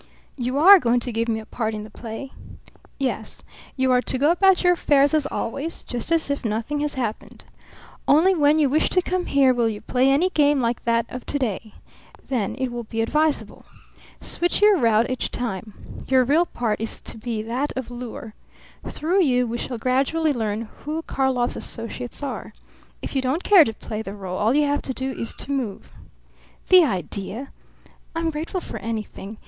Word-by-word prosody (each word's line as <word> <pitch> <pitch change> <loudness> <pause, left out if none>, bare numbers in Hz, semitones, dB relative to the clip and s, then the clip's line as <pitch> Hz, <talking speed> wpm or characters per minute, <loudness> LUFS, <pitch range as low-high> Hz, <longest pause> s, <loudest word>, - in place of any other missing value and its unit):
"You 255 0 -2
are 380 +6 +9
going 245 -4 +2
to 245 - -3
give 230 +1 -1
me 220 -1 0
a 220 - -10
part 220 -1 -3
in 210 - -5
the 215 - -11
play?" 230 +5 -7 0.7
"Yes. 270 -2 -3 0.3
You 260 0 +2
are 250 0 +4
to 260 - -2
go 290 +5 +3
about 380 +1 +4
your 355 0 +5
affairs 285 -4 +3
as 305 -2 +2
always, 285 +8 -4
just 245 +5 -4
as 325 -3 +1
if 280 - -2
nothing 225 +6 -2
had 295 -1 -2
happened. 235 -5 -5 0.6
Only 330 +7 +5
when 300 -3 +3
you 300 -2 +4
wish 300 +4 +2
to 365 - +3
come 365 0 -2
here 275 -2 +4
will 235 -2 +1
you 210 -2 -5
play 255 +4 +1
any 320 +7 +3
game 290 -3 +3
like 235 -1 -1
that 230 0 +2
of 255 - -7
to 290 - -1
day. 220 -4 -3 0.5
Then 235 -7 -1
it 260 -1 -2
will 240 -1 -5
be 225 +1 -3
advisable. 300 +5 0 0.6
Switch 350 0 0
your 415 -3 +5
route 230 -2 +3
each 255 - -2
time. 215 -3 -5 0.3
Your 260 -1 +4
real 320 +7 +3
part 225 -3 -2
is 225 - -3
to - - -7
be 220 -1 -3
that 250 +6 -2
of 255 -2 -5
lure. 245 -1 -7 0.5
Through 355 +6 0
you 250 -4 +2
we 235 0 -4
shall 245 - -4
gradually 275 +6 +1
learn 220 -3 -2 0.2
who 310 +2 -4
Karlov's 260 -4 0
associates 245 +3 -5
are. 280 - -5 0.5
If - - -6
you 265 - +2
don't 265 +7 -1
care 390 -5 +7
to 225 - -2
play 215 0 -6
the 200 -2 -7
role 190 -2 -5
all 225 +5 +2
you 300 0 +4
have 290 0 0
to 260 - -4
do 265 0 -2
is 230 -3 -4
to - - -5
move." 250 -8 -3 0.8
"The 370 -1 +8
idea! 205 - -4 0.6
I'm 330 0 0
grateful 320 +4 -4
for - - -7
anything. 215 -2 -6
255 Hz, 195 wpm, -23 LUFS, 230-295 Hz, 0.8 s, are